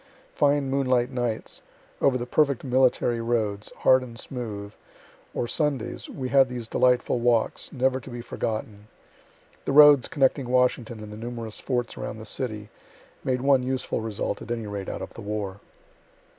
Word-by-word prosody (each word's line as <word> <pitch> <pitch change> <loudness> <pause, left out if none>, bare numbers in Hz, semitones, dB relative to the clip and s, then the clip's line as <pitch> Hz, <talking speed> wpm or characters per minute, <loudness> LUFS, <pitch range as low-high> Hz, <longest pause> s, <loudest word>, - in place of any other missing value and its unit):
Fine 145 -2 +2
moonlight 130 -2 +1
nights, 120 -3 -3 0.4
over 135 -2 +4
the 120 - -4
perfect 140 0 +2
military 125 -2 +2
roads, 110 -3 -1
hard 130 0 +6
and 120 -2 -9
smooth 105 -5 -6 0.6
or 120 - -2
Sundays 140 -5 -1
we 130 -1 -5
had 135 -1 +5
these 120 -2 -5
delightful 125 0 +2
walks, 120 -1 +1
never 130 0 +1
to 130 - -11
be 120 -1 -6
forgotten. 110 -3 -4 0.8
The - - -1
roads 145 -2 +8
connecting 135 -3 +1
Washington 125 -3 +1
and 105 0 -9
the - - -8
numerous 115 -1 -6
forts 120 -3 -2
around - - -5
the 110 - -9
city, 110 -3 -3 0.5
made 125 -1 0
one 135 -1 +4
useful 130 -2 -2
result, 105 -2 -3
at - - -9
any 115 -2 -2
rate, 100 -2 -5
out - - -5
of - - -9
the - - -9
war. 100 -2 -4
120 Hz, 160 wpm, -26 LUFS, 110-130 Hz, 0.8 s, roads